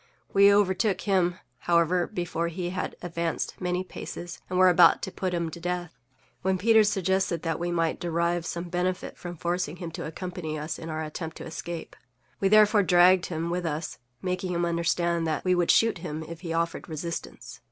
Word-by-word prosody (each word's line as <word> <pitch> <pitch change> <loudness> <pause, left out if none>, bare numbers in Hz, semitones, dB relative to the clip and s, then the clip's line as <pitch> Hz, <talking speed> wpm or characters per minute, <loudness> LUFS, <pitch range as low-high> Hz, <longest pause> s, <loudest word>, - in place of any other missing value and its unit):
We 200 0 +7
overtook 200 0 +3
_him,_however, 175 -2 +1
before 175 -3 -2
he 175 +1 -4
had 185 - -3
advanced 170 -1 -2
many 180 0 -1
paces, 175 -2 -8
and 180 - -1
were 185 0 +7
about 175 -2 +6
to 190 - -3
put 185 0 -2
him 170 -2 -2
to 170 - -8
death, 175 -2 -3 0.5
when 190 0 +1
Peters 220 +1 +5
suggested 190 -3 0
that 165 -2 -1
we 175 +1 -2
might 165 -2 0
derive 170 0 0
some 170 - -3
benefit 180 +1 -2
from 175 -1 -8
forcing 175 -1 -2
him 170 -2 -6
to - - -5
accompany 165 -1 -5
us 155 +1 -4
in 165 - -7
our 155 0 -3
attempt 160 +1 -6
to - - -8
escape. 165 +1 -6 0.4
We 195 - +2
therefore 215 +1 +6
dragged 180 0 +5
him 165 0 -3
with 180 0 -1
us, 155 +1 -4 0.2
making 185 0 -2
him 175 0 +1
understand 170 0 0
that 155 +1 -2
we 185 - +4
would 175 -1 +1
shoot 225 -5 +4
him 160 -2 -5
if 165 +1 -9
he 170 -3 -5
offered 165 +1 -2
resistance. 165 +2 -6
175 Hz, 185 wpm, -27 LUFS, 165-185 Hz, 0.5 s, We